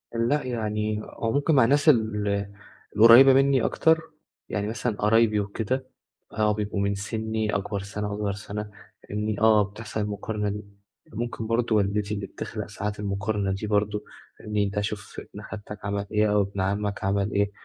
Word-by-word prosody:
لأ 120 +6 +1
يعني 105 -3 -2
هو 115 - -3
ممكن 145 +4 +2
مع 130 -4 +6
ناس 145 +5 +4
ال 105 -5 +1 0.5
القريبة 120 +5 +9
مني 135 -1 +4
أكتر، 160 0 +3 0.5
يعني 105 0 -2
مثلًا 110 +1 -2
قرايبي 110 0 +3
وكده 110 +6 -2 0.5
آه 105 -1 +2
بيبقوا 105 -1 -3
من 100 0 0
سني 110 +1 -2
أكبر 100 +1 -2
سنة 105 +1 -4
أصغر 105 -1 -1
سنة، 105 +1 -6 0.4
إني 105 0 -2
آه 110 -1 +5
بتحصل 105 +2 -6
المقارنة 105 0 -2
دي، 105 +1 -4 0.5
ممكن 115 0 -4
برضه 115 0 +1
والدتي 105 0 0
اللي 100 -1 -3
بتخلق - - -6
ساعات 105 +1 -4
المقارنة 100 0 -1
دي 95 +3 -3
برضه 105 0 0 0.4
مين 105 -1 +1
ده 100 +1 -2
شُوف 105 0 -5
ابن 105 - -8
خالتك 105 0 -8
عمل 100 0 -2
إيه 105 0 +2
أو 105 - +4
ابن 100 0 -3
عمك 100 +1 -1
عمل 100 +1 0
إيه، 100 0 +1
105 Hz, 165 wpm, -26 LUFS, 100-110 Hz, 0.5 s, القريبة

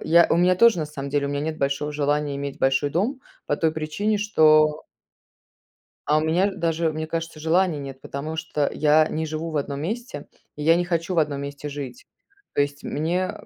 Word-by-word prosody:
я 170 +1 +6
у - - +4
меня 180 +1 +4
тоже, 230 -3 +5
на 155 - -2
самом 140 -2 -6
деле, 145 0 0
у - - -3
меня 145 0 -2
нет 155 +1 -3
большого 140 +2 -1
желания 145 0 0
иметь 140 -1 -5
большой 135 +2 +2
дом 240 - -1 0.3
по 145 - 0
той 160 -1 +1
причине, 200 +8 -1
что 155 -6 +4 1.3
А 150 - +4
у - - +2
меня, 170 +5 +2
э, 205 - -2
даже, 165 -1 0
мне 155 0 -4
кажется, 165 -1 -4
желания 165 0 +2
нет, 135 -1 -8
потому 150 +3 -5
что 160 -2 -1
я 155 +1 +4
не 160 +1 -2
живу 160 +1 -4
в 155 - -1
одном 140 0 -3
месте 215 - -5 0.3
и 150 - -6
я 165 +2 +5
не 175 +1 0
хочу 175 +1 -1
в - - +4
одном 145 -3 0
месте 140 +1 -6
жить. 140 -4 -7 0.5
То - - +2
есть 145 0 -3
мне, 175 +5 -1
э 210 - -12
155 Hz, 215 wpm, -24 LUFS, 145-165 Hz, 1.3 s, я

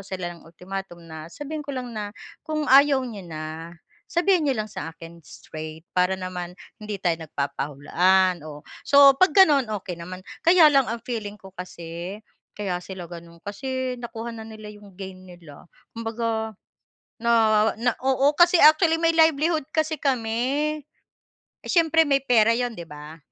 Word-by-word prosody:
sila 185 -3 -5
ng 170 - -15
ultimatum 180 +1 -8
na 160 -1 -9
sabihin 295 - -6
ko 285 -2 -6
lang 250 -1 -5
na, 210 -1 -6 0.2
"Kung 310 -1 -3
ayaw 275 -1 +5
niyo 225 -5 -7
na, 160 +2 -7 0.3
sabihin 355 0 +2
niyo 275 -5 0
lang 215 - -2
sa 165 - -6
akin 165 +1 -13
straight 155 +2 -10
para 180 +1 +2
naman 180 -1 -6 0.2
hindi 210 -2 -6
tayo 175 -3 +1
nagpapahulaan." 165 +6 +1
Oh, 150 -1 -9 0.2
so 280 -1 +7
'pag 370 +6 +4
gano'n, 300 - +6
okey 180 - -6
naman. 180 +2 -8 0.2
Kaya 340 -1 +7
lang 275 -3 +3
ang 230 0 -4
feeling 210 -4 -5
ko 190 - -13
kasi 175 +1 -7 0.4
kaya 195 -4 -2
sila 185 -2 -8
gano'n 170 -1 -11
kasi 260 +4 -4
nakuha 235 -1 -6
na 225 - -8
nila 215 -1 -10
'yong 205 -1 -15
gain 190 -1 -8
nila. 170 -5 -14 0.3
Kumbaga, 225 -1 -3 0.7
na 235 0 +2 0.5
na 245 +1 +2
oo, 270 +2 +3
kasi 345 +1 +6
actually, 320 +2 +6
may 330 0 +3
livelihood 320 -1 +3
kasi 315 0 0
kami. 270 +4 0 0.9
Siyempre 325 -1 +4
may 275 -1 +2
pera 230 -3 +4
'yon 245 -1 -1
'di 170 - -6
ba. 150 +1 -10
215 Hz, 155 wpm, -24 LUFS, 175-275 Hz, 0.9 s, so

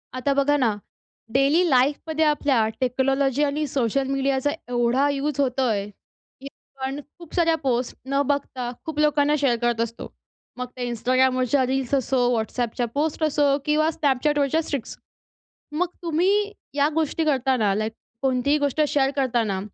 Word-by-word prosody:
आता 275 +2 0
बघा 280 +1 +2
ना, 235 -6 +1 0.6
डेली 280 +6 +4
लाईफमध्ये 295 +5 +2
आपल्या 280 -6 +2
टेक्नॉलॉजी 270 +2 +1
आणि 295 +1 0
सोशल 265 0 0
मीडियाचा 275 0 0 0.2
एवढा 245 +3 +2
युज 285 0 -2
होतोय, 250 -6 +1
की 265 +6 -17 0.3
आपण 265 +1 -4 0.2
खूप 340 -2 -13
साऱ्या 330 -2 +3
पोस्ट 250 -2 -1
न 275 +1 +2
बघता 270 -3 -2 0.2
खूप 315 -2 -4
लोकांना 295 0 +3
शेअर 270 -4 +2
करत 240 -1 +1
असतो. 230 0 -4 0.5
मग 250 - -3
त्या 250 - -5
Instagramवरच्या 255 +2 +2
रील्स 265 0 -2
असो, 265 0 0 0.2
WhatsAppच्या 240 +2 -2
पोस्ट 310 +2 -1
असो 290 -2 +2
किंवा 305 +1 +2
Snapchatवरच्या 290 +2 +1
स्ट्रीक्स. 280 -6 -5 0.7
मग 335 +4 0
तुम्ही 375 +5 +1 0.2
या 290 +1 +3
गोष्टी 320 0 0
करताना 260 -7 +2
लाइक 215 +2 -2 0.3
कोणतीही 265 +2 +2
गोष्ट 285 +1 0
शेअर 275 -2 +1
करतांना 235 -8 0
275 Hz, 140 wpm, -23 LUFS, 250-295 Hz, 0.7 s, डेली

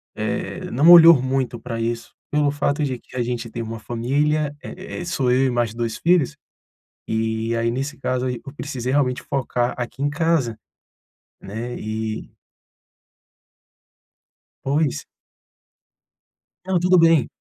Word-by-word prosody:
eh, - - -3
não 145 +7 +4
olhou 170 -4 +9
muito 130 -2 -1
pra 115 0 -5
isso, 115 0 -3 0.2
pelo 150 -1 +2
fato 145 +1 0
de 130 -4 -2
que - - -17
a 125 - 0
gente 120 -1 -4
tem 115 - -5
uma 115 0 -6
família, 145 +6 0
eh 185 -1 -7
eh - - -5
sou 135 -7 0
eu 130 +2 +3
e - - 0
mais 120 -3 0
2 115 -1 -3
filhos, 170 -5 +2 0.7
e 110 +1 -1
aí 115 0 +1
nesse 135 +5 -4
caso 130 -1 -1
aí 125 -2 -3
eu 140 - -9
precisei 130 -4 -4
realmente 130 -3 +1
focar 125 -2 -1
aqui 125 +2 -5
em 145 - +1
casa, 150 -7 0 0.8
né, 115 +5 -5
e 110 0 -4 2.3
Pois. 145 - 0 1.6
Não, 190 -1 +1
tudo 180 +1 +4
bem. 165 -4 +5
130 Hz, 140 wpm, -22 LUFS, 115-150 Hz, 2.3 s, olhou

